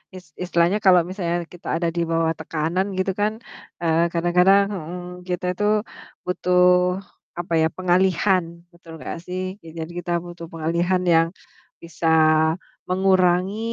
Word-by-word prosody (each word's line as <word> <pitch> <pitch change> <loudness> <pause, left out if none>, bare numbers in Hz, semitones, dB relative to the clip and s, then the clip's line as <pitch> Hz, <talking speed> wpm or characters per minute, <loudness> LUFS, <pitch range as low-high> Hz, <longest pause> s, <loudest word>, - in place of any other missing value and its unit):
is 185 - -10 0.2
istilahnya 175 +3 +2
kalau 180 -2 +7
misalnya 180 -3 -2 0.2
kita 175 - -12
ada 170 +1 0
di 170 - 0
bawah 165 0 +2
tekanan 165 +4 -1
gitu 190 +1 0
kan, 210 - +2 0.5
eee, 165 0 +3
kadang-kadang 180 +3 +4
mhm 180 0 -7
kita 180 0 -3
tuh 210 0 +2 0.5
butuh, 180 0 +1 0.8
apa 175 0 -4
ya, 160 - +4
pengalihan. 185 +1 +2 0.3
Betul 170 -1 -14
gak - - -5
sih. 180 +1 -4 0.2
Ya, 165 - -11
jadi 160 - -9
kita 175 - -5
butuh 175 -1 -9
pengalihan 170 +3 0
yang 165 -2 +4 0.6
bisa 165 0 -4 0.8
mengurangi 185 +1 +2
180 Hz, 135 wpm, -22 LUFS, 170-185 Hz, 0.8 s, kalau